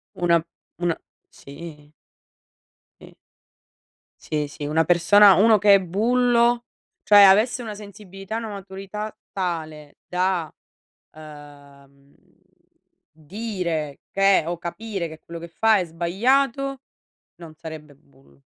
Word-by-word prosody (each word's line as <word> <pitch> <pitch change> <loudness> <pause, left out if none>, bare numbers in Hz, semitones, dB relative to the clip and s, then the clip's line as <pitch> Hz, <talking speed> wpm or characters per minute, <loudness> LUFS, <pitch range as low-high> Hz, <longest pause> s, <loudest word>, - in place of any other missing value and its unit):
Una 170 -2 +1 0.3
una 175 -1 -1 0.3
sì. 150 0 -12 1.1
Sì. - - -15 1.1
Sì, 150 -1 -3
sì, 145 0 -7
una 160 +2 +1
persona 195 +4 +6
uno 215 +3 +5
che 205 0 +5
è 195 - +5
bullo 235 +5 +1 0.4
cioè, 205 -1 +7
avesse 215 +6 +4
una 215 -2 -7
sensibilità 200 -1 -10
e - - -1
una 230 -1 -5
maturità 195 +1 -7
tale 160 -5 -5
da, 180 -3 -1 0.6
uhm, 145 -2 -16 1.0
dire 165 - -5
che 195 -2 +3
o 175 0 -3
capire 190 +2 -5
che 160 -1 -12
quello 170 +1 -10
che 170 - -9
fa 220 +5 +3
è 185 - -1
sbagliato, 250 +11 0 0.5
non 165 -2 -13
sarebbe 155 -2 -10
bullo. 70 - -26
180 Hz, 115 wpm, -23 LUFS, 155-210 Hz, 1.1 s, cioè